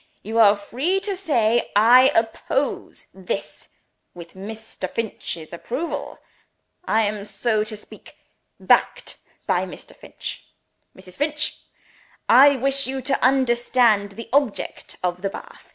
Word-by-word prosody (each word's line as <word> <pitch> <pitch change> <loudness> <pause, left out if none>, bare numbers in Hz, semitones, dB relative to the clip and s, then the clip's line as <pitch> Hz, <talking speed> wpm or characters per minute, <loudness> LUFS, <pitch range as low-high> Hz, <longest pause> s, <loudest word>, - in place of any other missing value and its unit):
You 225 +3 -2
are 210 -2 +7
free 265 - -1
to 405 -1 -3
say 240 - +1
'I 245 +5 +7
oppose 230 +5 -1
This, 190 -1 -6 0.5
with 170 -1 -11
Mr. 210 -1 -7
Finch's 175 -8 -5
approval: 255 - -5 0.7
I 220 +1 +2
am, 205 -1 -2
so 215 +1 -1
to 215 0 -7
speak, - - -14 0.4
backed - - +1 0.3
by - - 0
Mr. - - -12
Finch.' - - -8 0.5
Mrs. 185 -1 -13
Finch! 300 +1 -1 0.7
I 275 +4 +7
wish 275 +1 0
you 265 0 -4
to 270 +1 0
understand 240 -5 +2
the 230 +3 -9
object 275 -6 -1
of 180 0 -2
the 195 - -1
bath. - - -12
230 Hz, 125 wpm, -22 LUFS, 205-270 Hz, 0.7 s, are